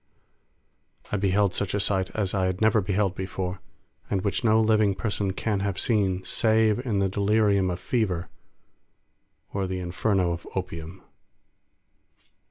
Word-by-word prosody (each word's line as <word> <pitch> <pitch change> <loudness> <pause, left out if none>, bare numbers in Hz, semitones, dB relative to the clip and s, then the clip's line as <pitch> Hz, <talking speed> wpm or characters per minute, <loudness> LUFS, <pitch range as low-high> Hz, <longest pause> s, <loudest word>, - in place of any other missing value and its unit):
I 105 - +1
beheld 100 0 +2
such 100 +1 -1
a - - +1
sight 95 -2 +2
as 100 -4 -1
I 95 -2 +1
had 95 0 -2
never 110 0 +3
beheld 100 0 0
before, 95 -1 -4 0.5
and 95 -2 -1
which 100 - -1
no 110 -1 +4
living 110 -3 +3
person 100 -3 -1
can 105 0 -1
have 100 -1 -2
seen 95 -5 +1
save 110 -1 +2
in 115 -6 -1
the 100 0 +2
delirium 100 -1 +2
of 90 0 -3
fever 95 -5 -1 1.3
or 100 -1 -1
the 95 0 -3
inferno 90 +1 0
of 85 0 -5
opium. 90 -1 -5
100 Hz, 145 wpm, -26 LUFS, 95-105 Hz, 1.3 s, no